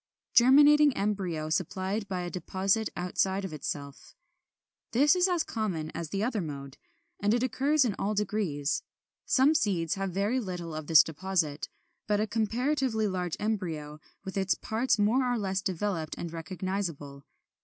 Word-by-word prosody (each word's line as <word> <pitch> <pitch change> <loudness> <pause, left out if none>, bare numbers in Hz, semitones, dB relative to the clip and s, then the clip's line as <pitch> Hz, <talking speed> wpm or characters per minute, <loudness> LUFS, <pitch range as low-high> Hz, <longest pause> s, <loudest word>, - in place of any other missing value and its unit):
31. 255 +3 +7
=Germinating 295 -1 +6
Embryo 185 -7 -1
supplied 190 +4 -1
from 190 -2 -3
a - - -4
Deposit 195 +5 0
outside 190 +2 0
of 180 - -6
Itself.= 140 -1 -6 0.8
This 290 +8 +5
is 360 +1 +3
as 350 -3 +1
common 180 -9 -3
as 170 -2 -5
the 200 +3 -2
other 225 -3 0
mode; 140 -4 -7 0.4
and 205 +3 +2
it 240 - 0
occurs 275 +3 +2
in 225 - 0
all 210 +2 -1
degrees. 190 -9 -1 0.5
Some 275 +4 +4
seeds 190 - +1
have 195 0 -2
very 205 +7 0
little 180 -7 -5
of 155 -1 -6
this 160 -2 +8
deposit, 160 -3 -2 0.4
but 210 -1 +2
a 215 - +2
comparatively 230 +1 0
large 180 -3 -2
embryo, 165 -8 -3 0.3
with 190 +1 -5
its 190 -1 +2
parts 225 +2 0
more 245 +5 +2
or 245 - +1
less 195 -2 -1
developed 185 -4 -2
and 170 -1 -6
recognizable. 165 -4 -4
195 Hz, 155 wpm, -29 LUFS, 165-225 Hz, 0.8 s, this